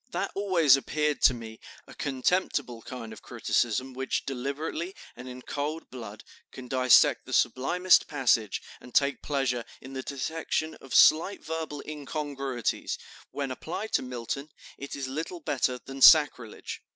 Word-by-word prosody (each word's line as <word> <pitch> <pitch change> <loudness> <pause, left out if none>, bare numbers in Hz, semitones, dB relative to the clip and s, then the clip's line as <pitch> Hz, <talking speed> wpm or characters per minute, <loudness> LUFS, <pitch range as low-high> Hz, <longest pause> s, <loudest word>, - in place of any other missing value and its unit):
That 200 -5 -2
always 180 -9 +4
appeared 150 +2 -1
to - - +6
me 110 -1 -9 0.3
a - - -13
contemptible 135 -3 -1
kind 115 -2 -8
of - - -12
criticism 130 +3 -1
which, 135 +1 -2
deliberately 140 +7 -4 0.2
and 125 +1 -9
in 125 0 -9
cold 150 +3 -4
blood, 110 -4 -9 0.3
can 130 -1 -10
dissect 130 -1 +4
the - - -6
sublimest 180 +8 +3
passage, 120 -7 +1 0.2
and 125 - -15
take 140 0 +3
pleasure 135 -4 -1 0.2
in 130 - -11
the 130 - -4
detection 155 +3 -3
of 135 - -6
slight 170 +5 +5
verbal 160 -2 -4
incongruities; 140 -4 -3 0.3
when 140 -2 -4
applied 180 +11 -5
to - - +2
Milton, 130 +4 -5 0.3
it 140 - -7
is 140 -2 -4
little 160 +6 -5
better 130 -4 0
than 135 +2 -10
sacrilege." 135 -7 +5
135 Hz, 145 wpm, -28 LUFS, 125-155 Hz, 0.3 s, to